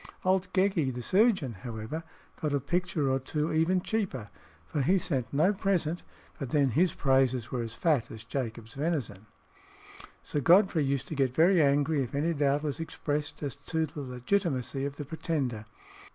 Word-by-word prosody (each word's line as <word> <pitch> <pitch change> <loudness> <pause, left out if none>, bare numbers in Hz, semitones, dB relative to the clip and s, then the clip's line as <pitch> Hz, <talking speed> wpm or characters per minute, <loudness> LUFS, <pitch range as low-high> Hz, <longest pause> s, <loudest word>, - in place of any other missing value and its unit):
Old 185 0 +2
Geckie, 185 -7 +2
the 125 -1 -6
surgeon, 190 - +3
however, 120 +6 -5 0.4
got 150 -2 0
a - - +2
picture 170 -1 0
or 135 - +1
two 150 +4 -2
even 170 +4 +2
cheaper, 180 - -2 0.3
for 150 - -2
he 180 +9 +3
sent 135 -10 -1
no 160 +8 +3
present, 180 -4 0 0.4
but 135 -5 -4
then 140 0 +3
his 165 +7 +2
praises 130 -3 +2
were 125 - -1
as 115 -1 -5
fat 145 -8 +1
as 110 - -9
Jacob's 115 -2 -5
venison. 135 - -3 1.0
Sir 145 - -2
Godfrey 175 +1 +5
used 135 -1 -1
to - - -4
get 135 -3 0
very 175 +2 +5
angry 145 +1 +3
if 125 0 -4
any 160 +4 +1
doubt 145 -1 +1
was 145 -1 -3
expressed 150 -2 -3
as 140 -4 -2
to 160 0 +1
the 150 0 -7
legitimacy 135 0 -1
of 140 0 -4
the 145 - -6
Pretender. 135 -7 -2
145 Hz, 170 wpm, -29 LUFS, 130-170 Hz, 1.0 s, Godfrey